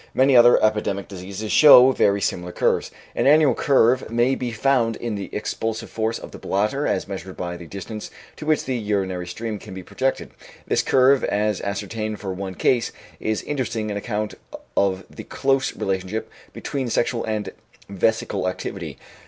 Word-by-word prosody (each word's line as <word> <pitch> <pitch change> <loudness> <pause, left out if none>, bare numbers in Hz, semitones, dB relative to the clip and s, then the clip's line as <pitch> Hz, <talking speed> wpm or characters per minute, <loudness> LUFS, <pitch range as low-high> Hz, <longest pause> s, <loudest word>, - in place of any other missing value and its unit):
Many 130 0 +4
other 120 0 +7
epidemic 105 -2 0
diseases 100 +2 -6
show 135 -4 +8
very 100 -5 +2
similar 90 -1 -2
curves. - - 0 0.3
An - - +1
annual 150 -2 +6
curve 130 -1 +3
may 120 +3 +2
be 125 -2 -2
found 115 -1 +1
in 120 -2 -4
the 100 -2 -5
expulsive 110 +1 -3
force 110 +1 -1
of - - -10
the - - -10
bladder 105 +9 0
as - - -1
measured 95 -1 -7
by 85 -1 -4
the 85 -1 -10
distance 100 +4 -7 0.3
to 150 - -8
which 155 -2 +2
the 130 - -2
urinary 95 -5 -2
stream 110 +3 -5
can 95 -3 -10
be 95 - -7
projected. 135 +8 -2 0.3
This - - +1
curve, 135 +1 +4
as 105 -1 0
ascertained 105 +2 -4
for 95 -2 -4
one 95 0 -6
case, 120 +3 +1 0.3
is 110 -1 -2
interesting 115 -7 -3
on 100 - -3
account 105 0 -3 0.4
of 95 -1 +1
the - - -10
close 135 -1 0
relationship 95 +3 -3 0.2
between 135 -3 -4
sexual 120 +1 0
and 110 -1 -3 0.4
vesical 100 -1 0
activity. 90 - -6
110 Hz, 170 wpm, -22 LUFS, 100-125 Hz, 0.4 s, show